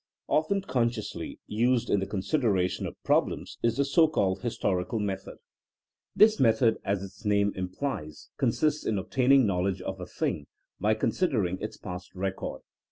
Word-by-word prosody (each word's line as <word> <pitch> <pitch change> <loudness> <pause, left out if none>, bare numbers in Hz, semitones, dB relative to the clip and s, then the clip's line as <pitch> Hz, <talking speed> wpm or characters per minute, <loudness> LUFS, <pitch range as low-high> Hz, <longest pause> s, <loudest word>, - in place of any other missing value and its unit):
Often 195 +6 +1
consciously 120 - -2
used 120 +3 +1
in 100 - +4
the 95 - -3
consideration 100 - 0
of - - -8
problems - - 0
is 115 +1 +1
the 140 - +2
so 160 +4 +5
called 100 -11 0
historical 100 -4 -1
method. 100 -2 -4 0.8
This 215 0 +6
method, 115 -1 +4
as 100 0 -1
its 100 +3 -11
name 100 -1 +2
implies, 90 - -5
consists 150 +6 +1
in 110 - 0
obtaining 130 +6 +4
knowledge 95 -1 0
of 95 0 -5
a 90 - -6
thing 75 - -2 0.3
by 110 +1 +2
considering 110 - 0
its - - -5
past 90 +1 -8
record. 95 +1 -3
105 Hz, 150 wpm, -28 LUFS, 95-130 Hz, 0.8 s, This